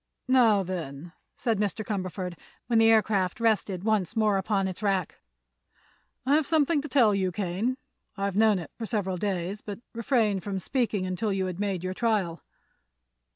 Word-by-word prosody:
"Now, 230 -6 +5
then," 170 -3 -6 0.2
said 225 -4 0
Mr. 210 +1 -1
Cumberford, 185 -3 -3 0.3
when 230 -2 +2
the 225 0 +6
aircraft 205 -4 +2
rested 210 -5 +1
once 215 -1 0
more 215 -3 +3
upon 195 -1 0
its 185 0 -6
rack, 195 -5 -1 1.1
"I've 290 +2 +3
something 310 -1 +2
to 300 - -6
tell 245 -6 +4
you, 190 -2 0
Kane. 200 +7 -2 0.4
I've 200 -1 -1
known 215 -1 +4
it 170 -4 -7
for 225 - -3
several 195 -5 -1
days, 190 +1 -2
but 205 -2 -6 0.2
refrained 230 -5 +1
from 200 -2 -3
speaking 215 -1 -1
until 185 +4 -1
you 190 -1 0
had 185 -1 -5
made 195 -4 -1
your 185 0 -2
trial." 200 -6 0
200 Hz, 160 wpm, -27 LUFS, 185-225 Hz, 1.1 s, the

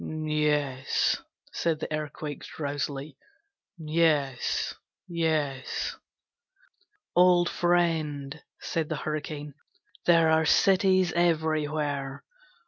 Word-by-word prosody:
'Yes,' 150 -3 0 0.3
said 165 -2 0
the 155 - -4
Earthquake, 150 -1 -5
drowsily; 145 -2 -4 0.6
'Yes, 155 -5 +1 0.3
yes.' 155 -6 -1 1.2
'Old 175 -1 +5
friend,' 160 -5 0 0.2
said 165 -3 -2
the 155 - -1
Hurricane, 150 -1 -4 0.5
'there 165 -2 +5
are 160 0 +3
cities 185 0 +4
everywhere. 155 -4 0
155 Hz, 75 wpm, -27 LUFS, 145-165 Hz, 1.2 s, Old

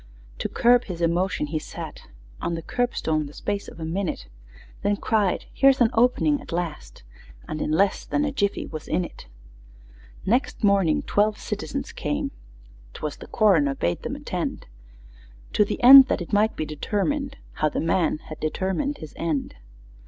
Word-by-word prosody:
To - - -2
curb 245 +1 +4
his 180 -4 -6
emotions, 170 -2 0
he 155 - 0
sat - - -9 0.3
On 170 - -1
the 165 - -6
curbstone 160 -12 -1
the 145 - -13
space 205 0 -3
of - - -11
a 160 - -4
minute, 170 - -3 0.6
Then 205 0 +1
cried, 205 -4 0
"Here's 275 0 +4
an 240 -2 +4
opening 250 +5 +3
at - - -11
last!" 160 - -5 0.4
And 155 - -4
in - - -1
less 190 +6 +2
than 295 0 0
a 290 - -1
jiffy 205 -7 -1
was 155 -1 -8
in 180 - 0
it! - - -12 1.0
Next 240 +3 0
morning 195 -6 +3
twelve 210 +1 +1
citizens - - -4
came - - -3 0.6
('Twas 150 - -5
the - - -11
coroner 165 -11 +3
bade 85 -8 -1
them - - -4
attend), - - -4 0.9
To 210 - +4
the 205 - -3
end 265 +1 +11
that - - 0
it 175 - -7
might 215 +2 +3
be 155 - -2
determined 270 - -2
How 155 - 0
the - - -3
man 165 -1 +1
had 155 - -8
determined 190 - -1
his 155 - -10
end! 155 - -2
190 Hz, 165 wpm, -24 LUFS, 155-235 Hz, 1.0 s, end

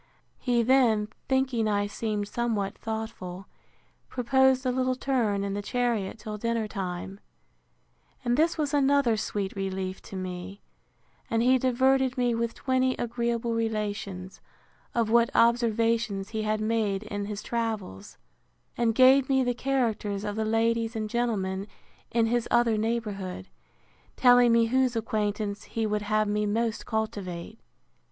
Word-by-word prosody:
He 240 -2 +1
then, 230 -4 +3 0.2
thinking 265 -4 +1
I 205 -1 +1
seemed 210 0 -3
somewhat 220 -4 -1
thoughtful, 220 -5 -6 0.6
proposed 265 +1 +2
a 255 - +2
little 255 0 0
turn 235 -7 0
in 200 0 -2
the 205 - -2
chariot 230 -2 -1
till 215 -1 -7
dinner 230 -1 -1
time: 190 -1 -5 1.1
And 240 0 +2
this 325 +5 +2
was 300 -2 -1
another 280 -4 +3
sweet 205 -2 -3
relief 190 -1 -3
to - - -8
me; 185 +1 -6 0.7
and 225 0 +1
he 255 +1 +4
diverted 260 +1 +2
me 245 -1 +2
with 230 0 -2
twenty 260 -1 +1
agreeable 235 0 -1
relations, 205 -4 -3 0.5
of 230 -2 +1
what 235 0 +5
observations 230 -3 +2
he 220 -1 -3
had 215 0 -1
made 215 -2 0
in 205 -1 -4
his 205 0 -5
travels; 220 - -4 0.6
and 230 -2 +1
gave 260 +1 +6
me 265 -1 +3
the 245 -1 0
characters 230 -6 -1
of 205 -1 -3
the 220 0 -1
ladies 225 +1 +1
and 215 -1 -3
gentlemen 200 -5 -1 0.4
in 230 -1 +2
his 240 +1 0
other 235 -2 +3
neighbourhood; 210 - -3 0.7
telling 245 -1 +6
me 230 0 +5
whose 255 +1 +1
acquaintance 210 -2 -2
he 225 -1 -2
would 210 0 0
have 215 +1 +1
me 210 0 0
most 225 +2 -1
cultivate. 205 -3 -4
225 Hz, 140 wpm, -27 LUFS, 205-240 Hz, 1.1 s, gave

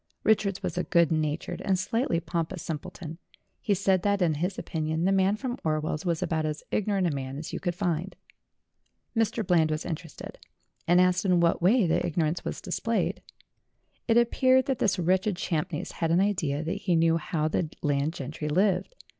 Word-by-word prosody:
Richards 200 -3 +2
was 180 - -2
a - - 0
good 170 -3 +3
natured 155 +2 -1
and 190 -1 +1
slightly 190 -1 0
pompous 170 +1 -3
simpleton. 160 +1 -6 0.4
He 205 - +1
said 190 -1 +2
that, 200 +1 +1
in 175 -4 +2
his 180 +6 -2
opinion, 160 +1 -2
the 190 - +3
man 195 +1 +3
from 245 +3 -4
Orwell's 155 +1 -1
was 170 -2 0
about 160 -1 -1
as 155 0 -3
ignorant 200 -2 +1
a 170 - +1
man 135 -1 -4
as 155 - -7
you - - -2
could 175 -2 -2
find. 180 -1 -2 1.0
Mr. 225 -1 0
Bland 165 -3 +3
was 155 +1 -2
interested, 165 -2 -7 0.5
and 175 +1 +5
asked 180 0 +3
in 180 -3 +3
what 170 0 +2
way 205 +5 +4
the 165 - +1
ignorance 160 0 -1
was - - -5
displayed. - - -1 0.9
It 230 -1 +4
appeared 255 +2 +4
that 265 -2 -1
this 200 -3 +2
wretched 185 +3 +1
Champneys 175 -1 -2
had 165 - -2
an 170 +2 +3
idea 165 -7 0
that 165 - -2
he 180 -4 +1
knew 165 0 +3
how 155 -1 -1
the 160 0 -1
landed 145 +1 +1
gentry 150 +1 -5
lived. 195 - +1
175 Hz, 185 wpm, -27 LUFS, 155-195 Hz, 1.0 s, and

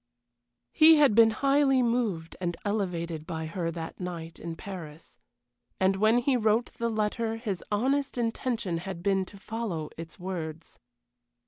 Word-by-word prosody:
He 320 +1 +7
had 290 -6 +5
been 225 +1 +7
highly 275 +2 +3
moved 225 -9 -1
and 175 -2 -2
elevated 170 -6 -2
by 160 -1 -4
her 165 +1 -3
that 165 -1 -6
night 170 -3 -6
in 165 0 -5
Paris. 165 -4 -9 0.6
And 190 +1 +3
when 215 +3 +4
he 255 +2 +2
wrote 225 0 +2
the 235 0 0
letter 220 +1 -1
his 210 -6 -4
honest 270 +6 +1
intention 230 -6 -1
had 180 -1 -6
been 195 -1 +2
to 200 - -13
follow 195 -7 -4
its 165 0 -8
words. 165 -3 -6
200 Hz, 145 wpm, -28 LUFS, 170-230 Hz, 0.6 s, He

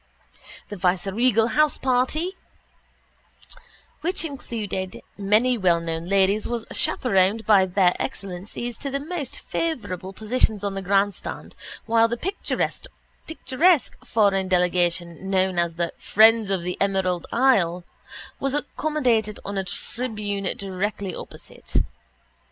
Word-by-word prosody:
The 205 - -6
viceregal 200 +6 +2
houseparty 300 +3 +1 1.7
which 350 0 -1
included 215 - -5
many 215 +5 +2
wellknown 170 -2 0
ladies 195 +2 +3
was 235 -2 -3
chaperoned 210 -1 +2
by 200 -3 +5
Their 180 -1 +3
Excellencies 205 +2 -5
to 280 - -4
the 275 +1 -2
most 300 -2 -5
favourable 205 - -3
positions 215 0 0
on 200 -1 -1
the 195 - -4
grandstand 195 +1 -1 0.3
while 230 0 +4
the 235 +1 -3
picturesque 330 -3 -1
foreign 200 -4 +2
delegation 175 0 0
known 190 -2 +2
as 170 -1 0
the 170 0 -2
Friends 220 0 +5
of 190 -3 0
the 180 +1 -3
Emerald 190 -3 0
Isle 190 -9 +3 0.6
was 275 0 -1
accommodated 255 -8 0
on 200 - -4
a 195 - 0
tribune 205 -1 -4
directly 195 0 -3
opposite. - - -10
205 Hz, 110 wpm, -24 LUFS, 185-245 Hz, 1.7 s, by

